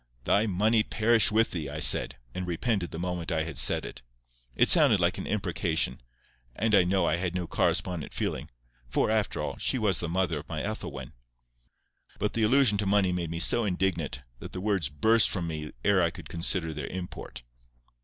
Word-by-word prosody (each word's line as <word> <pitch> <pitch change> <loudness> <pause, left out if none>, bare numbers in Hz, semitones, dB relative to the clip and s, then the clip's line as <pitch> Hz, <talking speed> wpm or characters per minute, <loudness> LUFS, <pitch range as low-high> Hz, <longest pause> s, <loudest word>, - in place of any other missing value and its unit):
"Thy 105 - +2
money 110 +4 +2
perish 110 +1 +2
with 110 +1 +2
thee!" 80 -5 -4
I 75 - -6
said, - - +2 0.2
and 90 -1 -5
repented 90 +1 -1
the - - -8
moment 90 0 -4
I 80 -1 0
had 80 - -6
said - - +3
it. - - -9 0.5
It - - +4
sounded - - +6
like - - +1
an - - -6
imprecation, 85 - -1 0.5
and 110 +1 -1
I 100 - +6
know 90 0 +1
I 85 - +1
had 90 0 -3
no 90 -1 -2
correspondent 85 -1 -1
feeling; - - -4 0.4
for, 105 - +1
after 110 -2 -1
all, - - -4
she - - 0
was 105 -7 +1
the 85 - -3
mother 85 -3 -1
of 75 - -13
my 75 -2 -4
Ethelwyn. 70 - -6 1.0
But 105 - -2
the 115 - -1
allusion 110 -2 +4
to 100 - -1
money 100 -2 +2
made 90 -2 -3
me 85 - -4
so 115 +7 +4
indignant, 90 -8 -2 0.2
that - - -10
the 90 - -5
words 95 -7 -1
burst 110 +10 +3
from 90 -4 -3
me 75 -2 -5
ere 100 -2 +4
I 85 - +2
could - - -11
consider 85 -1 -1
their 75 -2 -5
import. 90 -8 -8
90 Hz, 195 wpm, -27 LUFS, 85-105 Hz, 1.0 s, sounded